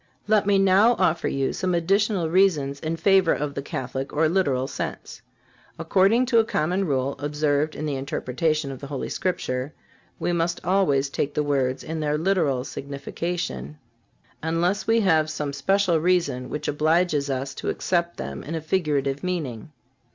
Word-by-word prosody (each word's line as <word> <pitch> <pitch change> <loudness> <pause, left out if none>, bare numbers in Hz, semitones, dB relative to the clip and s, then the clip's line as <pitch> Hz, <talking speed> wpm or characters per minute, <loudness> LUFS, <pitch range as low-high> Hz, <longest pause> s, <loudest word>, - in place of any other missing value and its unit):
Let 210 -2 +3
me 200 -1 +4
now 195 +4 +5
offer 170 -4 +1
you 135 -1 -1
some 185 -2 -1
additional 195 +1 +1
reasons 160 -6 +2
in 160 +2 -2
favor 190 0 +4
of 145 0 -3
the 140 - -4
Catholic 135 0 -4
or 155 +2 +2
literal 140 -7 +1
sense. - - -6 0.6
According 195 +9 +3
to 235 -2 +4
a - - +5
common 180 0 0
rule 135 -1 0
observed 150 +1 0
in 155 - -4
the 145 -3 -2
interpretation 140 +2 -1
of 130 - -8
the 140 - -8
Holy 140 -2 -4
Scripture, 135 -6 -2 0.5
we 175 - 0
must 170 +1 0
always 170 -7 +2
take 140 +1 -3
the 150 - +1
words 135 -3 0
in 160 0 -4
their 150 -1 0
literal 160 -7 +1
signification, 140 - -5 0.6
unless 170 +5 0
we 225 0 +4
have 160 -6 +3
some 150 -2 -3
special 180 +4 +2
reason 165 -7 +1
which 150 - -4
obliges 155 -1 +1
us 135 +1 -2
to - - -4
accept 170 -1 -1
them 70 0 -5
in 160 - -5
a 160 - -3
figurative 150 -4 -1
meaning. 155 -9 -4
155 Hz, 165 wpm, -24 LUFS, 140-185 Hz, 0.6 s, now